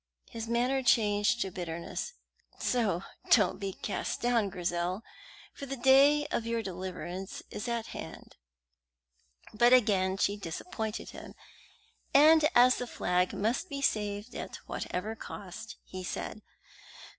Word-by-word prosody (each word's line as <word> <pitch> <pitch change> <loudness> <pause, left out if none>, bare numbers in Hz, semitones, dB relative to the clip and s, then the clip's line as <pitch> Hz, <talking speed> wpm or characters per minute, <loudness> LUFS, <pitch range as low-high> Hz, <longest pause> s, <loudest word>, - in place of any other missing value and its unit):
His 225 0 -5
manner 245 +3 +1
changed 220 -1 +3
to 190 - -1
bitterness. 170 - -5 0.4
"So 205 -8 0 0.3
don't 215 -3 +4
be 195 -1 -3
cast - - -3
down, 235 -4 +2
Grizel, 180 +2 -2 0.5
for 280 - -8
the 275 +1 -4
day 275 +4 +6
of 230 - -1
your 230 -1 -1
deliverance 185 0 -6
is 230 - -5
at 235 -2 -1
hand." - - -9 1.2
But 240 +3 +5
again 195 -6 +4
she 200 +1 +1
disappointed 215 - -5
him, - - -10 0.8
and 310 +2 +7
as 250 +1 +7
the 245 - -4
flag 180 -4 0
must 245 - -1
be 280 -2 -4
saved 210 0 -1
at - - -6
whatever 210 +5 -4
cost, 210 +1 -8
he 185 0 -8
said. 210 - -5
220 Hz, 130 wpm, -30 LUFS, 190-245 Hz, 1.2 s, and